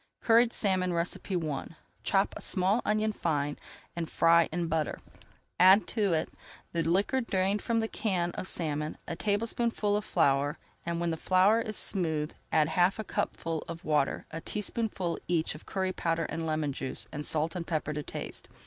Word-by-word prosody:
CURRIED 230 +1 +5
SALMON 185 -5 +1
I 170 -3 -2 0.3
Chop 195 0 +2
a - - -7
small 195 +4 +2
onion 215 0 +1
fine, 145 -6 -1 0.4
and 170 -2 -3
fry 165 0 +5
brown 175 +2 -3
in - - -2
butter. 160 -1 -1 0.6
Add 190 +3 +7
to 205 -5 +1
it 160 0 0 0.4
the 170 - +1
liquor 195 - +2
drained 195 -2 0
from 230 -1 +1
a - - 0
can 180 -6 -1
of 185 - -5
salmon, 155 -3 -2
and - - -4
a - - -4
tablespoonful 215 +1 0
of 210 - 0
flour. 145 -4 +2 0.3
When 170 0 -1
the 160 - -2
flour 190 +7 +4
is 215 -1 -3
smooth, 160 -6 -1 0.2
add 155 -1 +3
half 180 +3 +3
a 220 - -3
cupful 165 -5 -2
of 165 0 -7
water, 150 -3 +1
a 165 +1 -5
teaspoonful 205 -4 -2
each 170 -2 +1
of 150 - -12
curry 190 -1 -1
powder 165 -2 0
and 160 +1 -3
lemon 155 -2 0
juice, 130 - -2
and 150 - -4
salt 155 +3 -1
and 170 -2 -4
pepper 155 -2 -1
to 150 - -3
taste. - - -7
175 Hz, 175 wpm, -30 LUFS, 160-205 Hz, 0.6 s, Add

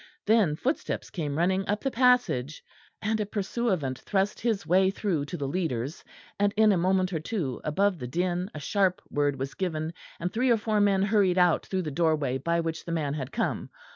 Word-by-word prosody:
Then 210 -8 +3
footsteps 265 - -2
came 150 -5 -3
running 190 +3 +1
up 210 +1 0
the 270 - -1
passage, 245 - +2 0.4
and 220 0 0
a 210 - 0
pursuivant 195 - -1
thrust 195 0 -1
his 225 -4 -1
way 190 +2 +4
through 190 -7 -1
to 175 +4 -6
the 140 -3 -3
leaders; 145 -3 -2 0.4
and, 205 0 +3
in 215 -1 +6
a - - +3
moment 185 +1 +1
or 160 - 0
two, 155 - -3
above 190 +4 +1
the 125 - -5
din 180 +6 -1
a - - -4
sharp 195 +4 +1
word 145 -1 +1
was 135 +1 -4
given, 160 -3 -3 0.3
and 180 +1 -3
three 250 +3 +1
or 235 - +5
four 215 -1 0
men 195 -1 +3
hurried 200 -3 +3
out 180 -2 +3
through 190 -1 -1
the 155 - -4
doorway 150 -4 +1
by 170 +5 0
which 165 0 -4
the 170 - -6
man 150 -4 -1
had 140 -2 -4
come. 225 - -2
180 Hz, 200 wpm, -27 LUFS, 155-205 Hz, 0.4 s, in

